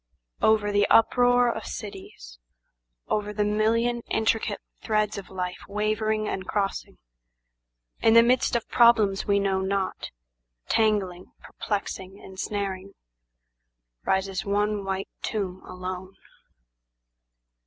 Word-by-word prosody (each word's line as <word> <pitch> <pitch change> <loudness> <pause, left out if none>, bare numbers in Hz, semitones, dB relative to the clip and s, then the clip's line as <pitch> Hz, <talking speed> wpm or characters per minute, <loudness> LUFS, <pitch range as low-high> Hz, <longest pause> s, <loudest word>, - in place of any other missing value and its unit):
Over 215 -1 +3
the 205 0 +3
uproar 245 +1 +4
of 220 - -6
cities, 190 - -9 0.7
Over 210 0 -1
the 210 0 0
million 230 +3 +1
intricate 220 -1 0 0.2
threads 215 -2 0
of 195 - -11
life 180 -1 -4
wavering 215 +1 0
and 190 -1 -4
crossing, 200 -2 -2 1.0
In 225 0 +5
the 230 - +9
midst 250 +1 +2
of 235 - -1
problems 220 -5 +4
we 200 -1 +3
know 195 -1 +1
not, 190 0 -2 0.6
tangling, 200 -5 0
perplexing, 195 -2 -4
ensnaring, 195 0 -5 1.1
Rises 190 -1 0
one 205 0 0
white 195 0 -3
tomb 190 -4 -3
alone. 185 +1 -6
205 Hz, 105 wpm, -26 LUFS, 190-220 Hz, 1.1 s, the